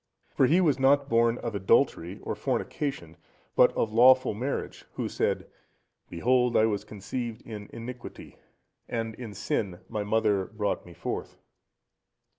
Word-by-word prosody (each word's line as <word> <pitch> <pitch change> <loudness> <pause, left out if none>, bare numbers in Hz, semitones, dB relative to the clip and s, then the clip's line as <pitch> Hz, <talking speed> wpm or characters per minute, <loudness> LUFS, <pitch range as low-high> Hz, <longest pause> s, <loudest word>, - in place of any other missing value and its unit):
For 130 - +3
he 170 +7 +4
was 150 -7 +2
not 140 +1 +4
born 115 0 +3
of 115 -2 -4
adultery 95 -2 +2
or - - -2
fornication, 110 - -3 0.4
but - - +6
of 110 -2 0
lawful 130 +2 +6
marriage, 130 +7 -4
who - - -3
said, - - -1 0.6
"Behold 125 +7 +2
I 110 - +5
was 105 -2 -1
conceived 110 +3 -6
in 105 -3 -8
iniquity, 120 +2 -9 0.5
and 115 -1 -2
in 110 -3 -8
sin 95 -1 -2
my 105 -2 -2
mother 105 -2 +1
brought 105 -2 -3
me 85 - -13
forth." - - -5
115 Hz, 140 wpm, -28 LUFS, 105-125 Hz, 0.6 s, but